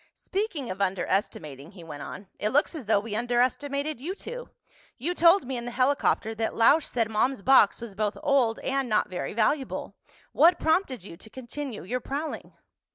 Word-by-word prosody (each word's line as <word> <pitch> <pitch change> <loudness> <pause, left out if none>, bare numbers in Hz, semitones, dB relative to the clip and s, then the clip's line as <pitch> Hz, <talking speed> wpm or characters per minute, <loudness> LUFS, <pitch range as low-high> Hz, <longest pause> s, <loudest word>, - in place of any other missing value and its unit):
"Speaking 375 - -3
of 190 +2 -6
underestimating," 185 -5 -2
he 180 -4 -12
went 150 -3 -8
on, 200 - -8
"it 210 - 0
looks 290 +9 +2
as 290 -10 -7
though 210 -2 +4
we 210 0 -5
underestimated 260 +4 0
you 355 +7 -4
two. - - -8 0.5
You 310 +8 -2
told 345 +1 +5
me 260 0 -3
in 235 - -5
the - - -3
helicopter 255 -3 +1
that 225 0 -2
Lausch 285 +7 +4
said 230 -3 0
Mom's 220 +2 0
box 265 -6 +5
was 235 -3 -8
both 210 +1 -2
old 255 -6 +3
and 270 -1 -1
not 215 - +2
very 180 - -4
valuable. 265 +5 -1 0.4
What 345 +1 +5
prompted 315 - +1
you 170 -4 -10
to 220 - -15
continue 260 0 -7
your 245 +8 -2
prowling?" 295 +3 -5
245 Hz, 180 wpm, -27 LUFS, 210-285 Hz, 0.5 s, told